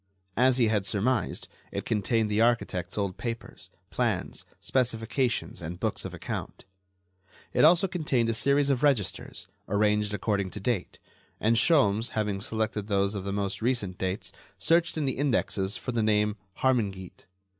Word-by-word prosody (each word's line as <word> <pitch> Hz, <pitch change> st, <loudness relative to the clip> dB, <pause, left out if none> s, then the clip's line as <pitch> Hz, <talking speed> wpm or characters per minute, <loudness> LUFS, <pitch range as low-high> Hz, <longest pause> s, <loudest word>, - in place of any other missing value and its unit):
As 130 Hz, +1 st, +4 dB
he 120 Hz, -3 st, +4 dB
had 105 Hz, -3 st, +1 dB
surmised, 110 Hz, +1 st, 0 dB, 0.2 s
it -, -, -4 dB
contained 110 Hz, 0 st, +1 dB
the 105 Hz, +2 st, +2 dB
architect's 105 Hz, -6 st, +1 dB
old 100 Hz, -3 st, -1 dB
papers, 115 Hz, -1 st, -6 dB, 0.2 s
plans, -, -, -1 dB
specifications 120 Hz, 0 st, 0 dB
and 85 Hz, +2 st, -6 dB
books -, -, -1 dB
of -, -, -4 dB
account. -, -, -6 dB, 0.9 s
It -, -, +3 dB
also 170 Hz, +5 st, +6 dB
contained 150 Hz, -10 st, 0 dB
a 115 Hz, -, +1 dB
series 140 Hz, +4 st, +3 dB
of 130 Hz, -, 0 dB
registers, 130 Hz, -11 st, 0 dB, 0.2 s
arranged 105 Hz, 0 st, +2 dB
according 100 Hz, -3 st, 0 dB
to 105 Hz, -, -7 dB
date, 105 Hz, -2 st, -2 dB, 0.4 s
and 115 Hz, +2 st, +3 dB
Sholmes, 115 Hz, -5 st, +3 dB
having 105 Hz, -2 st, 0 dB
selected 110 Hz, -1 st, -2 dB
those 100 Hz, -1 st, +1 dB
of 100 Hz, -2 st, -4 dB
the 100 Hz, -, -2 dB
most 100 Hz, 0 st, -2 dB
recent 110 Hz, -7 st, 0 dB
dates, 95 Hz, 0 st, -2 dB, 0.3 s
searched 165 Hz, -, +2 dB
in 150 Hz, -, 0 dB
the 130 Hz, -, -1 dB
indexes 105 Hz, -8 st, 0 dB
for 125 Hz, -, -4 dB
the 115 Hz, -2 st, 0 dB
name 105 Hz, -1 st, +2 dB, 0.3 s
"Harmingeat." 100 Hz, -8 st, -1 dB
110 Hz, 155 wpm, -28 LUFS, 100-125 Hz, 0.9 s, also